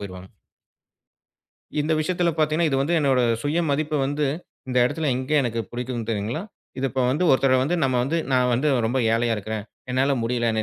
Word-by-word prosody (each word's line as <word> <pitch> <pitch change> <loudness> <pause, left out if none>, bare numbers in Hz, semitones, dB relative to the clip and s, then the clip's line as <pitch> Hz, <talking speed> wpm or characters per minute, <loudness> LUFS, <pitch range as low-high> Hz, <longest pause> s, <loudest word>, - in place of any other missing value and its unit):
போயிருவாங்க. 95 -2 -8 1.5
இந்த 155 +2 0
விஷயத்துல 175 +2 +1
பாத்தீங்கன்னா, 155 +2 +2
இது 135 - +1
வந்து 150 +5 +1
என்னோட 135 -4 +2 0.2
சுயமதிப்ப 155 0 0
வந்து 145 +2 -1 0.4
இந்த 125 0 +1
இடத்துல, 155 +5 -1
எங்க 130 +3 -4
எனக்கு 115 -2 -2
புடிக்கும்னு 120 -2 -4
தெரியுங்களா? 110 - -2 0.4
இதப்போ 130 0 -1
வந்து 150 +8 +1
ஒருத்தர் 130 -1 +4
வந்து 160 +6 0
நம்ம 130 -2 +2
வந்து 140 +7 -1 0.2
"நான் 125 -1 +3
வந்து 135 +6 +1 0.2
ரொம்ப 120 +4 0
ஏழையா 115 0 +1
இருக்கிறேன். 105 0 -4 0.3
என்னால 135 +2 +2
முடியலன்னு, 115 -2 0
130 Hz, 160 wpm, -23 LUFS, 120-150 Hz, 1.5 s, ஒருத்தர்